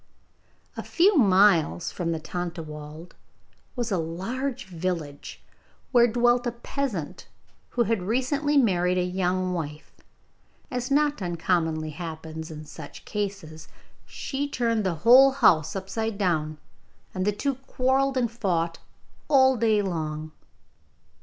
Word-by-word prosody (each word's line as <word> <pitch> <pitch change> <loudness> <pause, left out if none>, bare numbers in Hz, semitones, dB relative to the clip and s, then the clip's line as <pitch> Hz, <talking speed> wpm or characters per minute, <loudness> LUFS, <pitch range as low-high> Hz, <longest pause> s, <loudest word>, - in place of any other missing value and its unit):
A - - -4
few 380 +4 +3
miles 195 - +4
from 170 -2 -3
the 165 - -2
Tontlawald 160 -1 -7 0.6
was 240 -3 -3
a 190 - +1
large 230 +12 -4
village, 170 -5 -5 0.5
where 240 -2 +6
dwelt 240 +1 +2
a 240 - -2
peasant 235 - -4 0.5
who 240 - +5
had 225 -2 0
recently 265 +8 0
married 180 -7 +3
a 180 - +2
young 185 0 -1
wife. 155 -3 -5 0.8
As 250 0 -3
not 295 -2 +2
uncommonly 165 -3 -1
happens 160 0 -7
in 155 -1 -8
such 150 -1 -11
cases, 195 -7 -5 0.4
she 285 +1 -4
turned 230 -5 0
the 185 -3 0
whole 265 +3 +8
house 165 - +3
upside 205 +3 -3
down, 155 -6 0 0.6
and 185 - -2
the 210 - +2
two 275 +7 -1
quarrelled 265 +1 +1
and 240 -3 +1
fought 170 -7 -1 0.5
all 265 -2 +5
day 220 -3 +2
long. 155 -4 -4
190 Hz, 125 wpm, -26 LUFS, 165-245 Hz, 0.8 s, whole